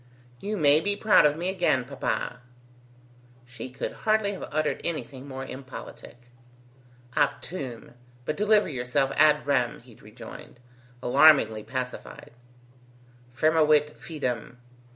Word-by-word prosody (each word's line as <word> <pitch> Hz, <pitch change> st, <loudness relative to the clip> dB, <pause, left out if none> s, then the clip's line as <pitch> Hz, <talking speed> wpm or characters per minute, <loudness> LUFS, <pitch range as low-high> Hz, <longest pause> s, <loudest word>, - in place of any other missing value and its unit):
"You 210 Hz, +6 st, -3 dB
may 150 Hz, -2 st, +5 dB
be 200 Hz, +4 st, -1 dB
proud 210 Hz, -7 st, +5 dB
of 150 Hz, +1 st, -2 dB
me 175 Hz, +2 st, -2 dB
again, 175 Hz, -9 st, +1 dB
papa." 130 Hz, -2 st, -3 dB, 1.0 s
She 125 Hz, 0 st, -9 dB
could 125 Hz, -, -5 dB
hardly 215 Hz, -2 st, +1 dB
have 195 Hz, -, -7 dB
uttered 155 Hz, 0 st, -1 dB
anything 145 Hz, -5 st, -5 dB
more 135 Hz, -1 st, -6 dB
impolitic. 130 Hz, -2 st, -10 dB, 1.0 s
"Optume; 130 Hz, -10 st, -2 dB, 0.3 s
but 155 Hz, -, -2 dB
deliver 210 Hz, +1 st, +3 dB
yourself 130 Hz, -1 st, 0 dB
ad 150 Hz, 0 st, +4 dB
rem," 130 Hz, -4 st, +1 dB
he 120 Hz, -1 st, -17 dB
rejoined, 110 Hz, +3 st, -12 dB, 0.4 s
alarmingly 135 Hz, -5 st, +5 dB
pacified. 125 Hz, +1 st, -6 dB, 1.0 s
"Firmavit 150 Hz, +2 st, +3 dB
fidem. 125 Hz, -7 st, -5 dB
145 Hz, 110 wpm, -26 LUFS, 125-160 Hz, 1.0 s, may